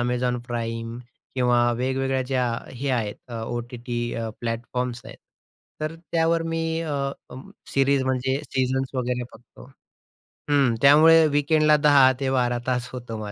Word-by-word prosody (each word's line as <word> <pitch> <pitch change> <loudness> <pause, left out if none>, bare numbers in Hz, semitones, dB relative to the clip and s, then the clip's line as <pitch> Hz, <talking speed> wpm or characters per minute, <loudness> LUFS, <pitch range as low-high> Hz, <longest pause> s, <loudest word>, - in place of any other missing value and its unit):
Amazon 125 0 0
Prime 115 0 -4 0.4
किंवा 120 -1 +3
वेगवेगळ्या 130 +1 0
ज्या 130 -2 +1 0.3
हे 130 +2 -4
आहेत, 110 -5 -1
अ, 120 - -8 0.2
ओ-टी-टी 120 0 -5 0.2
अ, 115 -1 -3
प्लॅटफॉर्म्स 120 +1 -3
आहेत, - - -11 0.6
तर 155 +1 -3
त्यावर 165 0 0
मी 165 - -1 0.2
अ, 140 -3 -2 0.6
सीरीज 135 0 +2
म्हणजे 130 +1 0
सीझन्स 130 +1 -1
वगैरे 125 -1 -1
बघतो. 120 +1 -16 0.9
हं, 140 -5 +3
त्यामुळे 160 +3 +7
वीकेंडला 150 +1 +3
10 145 -3 +5
ते 135 -1 0
12 125 -2 +1
तास 125 -1 -1
होतं 120 -3 -6
130 Hz, 130 wpm, -24 LUFS, 120-140 Hz, 0.9 s, त्यामुळे